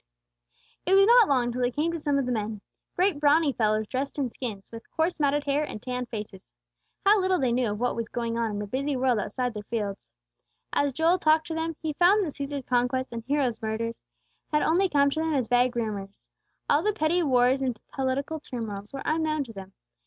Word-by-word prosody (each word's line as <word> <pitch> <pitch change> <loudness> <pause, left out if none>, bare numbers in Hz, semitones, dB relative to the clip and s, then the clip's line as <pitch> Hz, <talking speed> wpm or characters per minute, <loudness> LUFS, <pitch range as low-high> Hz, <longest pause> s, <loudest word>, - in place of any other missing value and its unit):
It 380 - +3
was 390 0 +7
not 475 0 +7
long 250 -3 +2
till 250 +1 -3
they 245 - +2
came 300 +6 -1
to 335 - -4
some 290 -2 0
of 275 - 0
the 250 - -2
men, 215 -2 -3 0.3
great 360 -4 +2
brawny 295 0 +4
fellows 215 -2 +1
dressed 270 +6 -3
in 265 -4 -1
skins, 215 -7 -6
with 230 0 -10
coarse 325 +1 -1
matted 290 0 +2
hair 285 +1 +1
and 255 - -6
tanned 250 +1 -4
faces. 210 - -7 0.6
How 405 0 +6
little 370 0 +2
they 260 -5 +1
knew 240 -1 +1
of 205 0 -4
what 245 +1 0
was 230 -1 -3
going 235 -1 -3
on 230 -1 0
in 205 - -4
the 205 - -3
busy 275 +7 -2
world 250 -3 +2
outside 245 +4 -2
their 210 - -5
fields! 205 -2 -4 0.6
As 285 -1 +2
Joel 330 +6 +2
talked 315 -1 +3
to - - -2
them 325 0 -2
he 310 -1 -1
found 375 +7 +4
that 310 -6 -4
Cæsar's 280 -2 -5
conquests 250 +1 0
and 230 -1 -5
Hero's 270 -5 0
murders 225 +1 -3 0.5
had 300 -1 +2
only 365 +4 +3
come 280 -2 +3
to 315 - -2
them 320 -1 0
as 255 -4 0
vague 245 +1 +2
rumors. 205 -4 -4 0.4
All 290 - +3
the 425 +4 +1
petty 330 +1 +1
wars 260 -3 +3
and 250 -4 -2
political 270 +4 -2
turmoils 215 -7 -6
were 275 - -6
unknown 310 -1 0
to 235 -4 -11
them. 195 -1 -9
260 Hz, 220 wpm, -27 LUFS, 230-310 Hz, 0.6 s, was